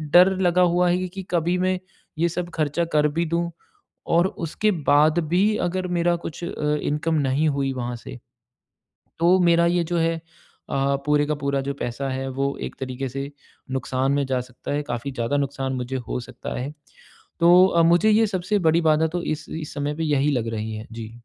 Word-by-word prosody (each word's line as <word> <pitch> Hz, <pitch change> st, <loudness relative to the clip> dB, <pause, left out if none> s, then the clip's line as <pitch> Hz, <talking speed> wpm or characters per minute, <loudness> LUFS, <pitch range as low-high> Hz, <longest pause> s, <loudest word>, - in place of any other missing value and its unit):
डर 185 Hz, +2 st, +7 dB
लगा 180 Hz, -1 st, +3 dB
हुआ 180 Hz, 0 st, +3 dB
है 180 Hz, +1 st, +1 dB
कि 190 Hz, +1 st, -7 dB
कभी 175 Hz, +1 st, +1 dB
मैं 185 Hz, 0 st, +1 dB, 0.4 s
ये 170 Hz, -, +3 dB
सब 175 Hz, +1 st, -4 dB
खर्चा 155 Hz, +1 st, 0 dB
कर 150 Hz, 0 st, +4 dB
भी 170 Hz, -, +2 dB
दूँ 170 Hz, +1 st, -1 dB, 0.7 s
और 175 Hz, +2 st, +5 dB, 0.2 s
उसके 210 Hz, +7 st, 0 dB, 0.2 s
बाद 150 Hz, +3 st, +5 dB
भी 180 Hz, +2 st, +3 dB, 0.2 s
अगर 185 Hz, +1 st, -2 dB
मेरा 175 Hz, 0 st, +2 dB
कुछ 165 Hz, -, -7 dB
अ, -, -, -3 dB, 0.3 s
इनकम 150 Hz, +2 st, 0 dB
नहीं 145 Hz, +4 st, +2 dB
हुई 140 Hz, -2 st, 0 dB
वहाँ 120 Hz, -1 st, -3 dB
से, 60 Hz, -, -10 dB, 1.0 s
तो 175 Hz, +3 st, +4 dB
मेरा 170 Hz, -1 st, +4 dB
ये 175 Hz, 0 st, +2 dB
जो 175 Hz, +1 st, -1 dB
है 165 Hz, 0 st, +2 dB
अ, -, -, -8 dB, 0.9 s
पूरे 150 Hz, 0 st, +3 dB
का 150 Hz, -, 0 dB
पूरा 140 Hz, 0 st, 0 dB
जो 140 Hz, +1 st, -3 dB
पैसा 130 Hz, +3 st, -3 dB
है, 130 Hz, 0 st, -3 dB
वो 135 Hz, +1 st, -2 dB
एक -, -, -6 dB
तरीके 130 Hz, 0 st, -4 dB
से 135 Hz, +2 st, -5 dB, 0.4 s
नुकसान 130 Hz, +1 st, 0 dB
में 140 Hz, 0 st, +1 dB
जा 130 Hz, -1 st, 0 dB
सकता 125 Hz, +2 st, -7 dB
है, 145 Hz, +1 st, 0 dB
काफ़ी 120 Hz, 0 st, -4 dB
ज़्यादा 120 Hz, +3 st, -1 dB
नुकसान 135 Hz, -1 st, -2 dB
मुझे 125 Hz, +1 st, -3 dB
हो -, -, -2 dB
सकता 120 Hz, -, -7 dB
है। 135 Hz, +4 st, -4 dB, 0.7 s
तो 175 Hz, +2 st, +7 dB
अ, 170 Hz, -3 st, +3 dB
मुझे 175 Hz, +6 st, +4 dB
ये 220 Hz, +1 st, +4 dB
सबसे 200 Hz, +1 st, -1 dB
बड़ी 165 Hz, +2 st, +3 dB
बाधा 155 Hz, +1 st, +3 dB
तो 175 Hz, -, -2 dB
इस 155 Hz, -2 st, -3 dB
इस 155 Hz, -2 st, -6 dB
समय 145 Hz, 0 st, -2 dB
पे 165 Hz, -, -2 dB
यही 145 Hz, -1 st, +2 dB
लग 120 Hz, -4 st, -1 dB
रही 110 Hz, 0 st, -4 dB
है। 110 Hz, +1 st, -7 dB
जी। 115 Hz, -1 st, -7 dB
150 Hz, 200 wpm, -23 LUFS, 135-175 Hz, 1.0 s, डर